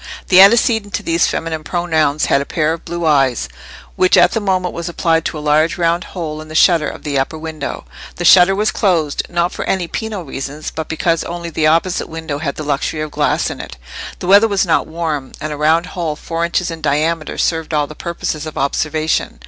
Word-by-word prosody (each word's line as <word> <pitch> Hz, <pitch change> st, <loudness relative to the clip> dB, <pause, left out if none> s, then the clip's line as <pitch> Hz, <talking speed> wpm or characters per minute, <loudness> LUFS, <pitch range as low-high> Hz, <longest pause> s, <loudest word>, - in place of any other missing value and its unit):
The 185 Hz, 0 st, +8 dB
antecedent 220 Hz, 0 st, +4 dB
to -, -, -3 dB
these 165 Hz, 0 st, +2 dB
feminine 160 Hz, -1 st, -3 dB
pronouns 160 Hz, -4 st, 0 dB
had 140 Hz, -, +2 dB
a -, -, -4 dB
pair 155 Hz, -1 st, 0 dB
of 165 Hz, -, -8 dB
blue 170 Hz, -1 st, -4 dB
eyes, 135 Hz, -6 st, +2 dB, 0.5 s
which 185 Hz, -, +3 dB
at -, -, +6 dB
that 225 Hz, -, 0 dB
moment 185 Hz, -3 st, 0 dB
were 170 Hz, -, -5 dB
applied 165 Hz, -1 st, 0 dB
to -, -, -3 dB
a 150 Hz, -, -7 dB
large 155 Hz, +2 st, +2 dB
round 170 Hz, +1 st, +1 dB
hole 155 Hz, -3 st, -4 dB
in 155 Hz, -, -11 dB
the 155 Hz, -, -9 dB
shutter 165 Hz, -2 st, +4 dB
of -, -, -10 dB
the 140 Hz, -2 st, -1 dB
upper 135 Hz, +4 st, -2 dB
window. 155 Hz, -2 st, -6 dB, 0.3 s
The 175 Hz, -, -4 dB
shutter 180 Hz, +2 st, +7 dB
was 210 Hz, +2 st, +1 dB
closed, 165 Hz, -8 st, +1 dB
not 175 Hz, +1 st, 0 dB
for -, -, -5 dB
any 185 Hz, -3 st, -1 dB
penal 215 Hz, -1 st, -4 dB
reasons, 140 Hz, +1 st, -6 dB
but 160 Hz, -1 st, -5 dB
because 165 Hz, 0 st, 0 dB
only 170 Hz, 0 st, -6 dB
the 155 Hz, 0 st, +1 dB
opposite 165 Hz, +3 st, +1 dB
window 160 Hz, -3 st, -5 dB
had 145 Hz, -3 st, -3 dB
the 155 Hz, -, -5 dB
luxury 145 Hz, +1 st, -2 dB
of 155 Hz, -1 st, -4 dB
glass -, -, 0 dB
in -, -, -8 dB
it: 65 Hz, -, -10 dB, 0.4 s
the -, -, -7 dB
weather 200 Hz, +4 st, +6 dB
was 200 Hz, -2 st, +1 dB
not 170 Hz, -, +1 dB
warm, 155 Hz, -4 st, -4 dB
and 155 Hz, 0 st, -4 dB
a -, -, -4 dB
round 160 Hz, +3 st, +2 dB
hole 170 Hz, -5 st, -3 dB
four 165 Hz, +2 st, -4 dB
inches 170 Hz, +1 st, -1 dB
in 165 Hz, -1 st, -7 dB
diameter 155 Hz, +3 st, -1 dB
served 160 Hz, -1 st, -1 dB
all 150 Hz, -2 st, +1 dB
the 155 Hz, -, -10 dB
purposes 160 Hz, -1 st, -4 dB
of 155 Hz, -, -8 dB
observation. 155 Hz, -, -1 dB
165 Hz, 220 wpm, -17 LUFS, 155-175 Hz, 0.5 s, The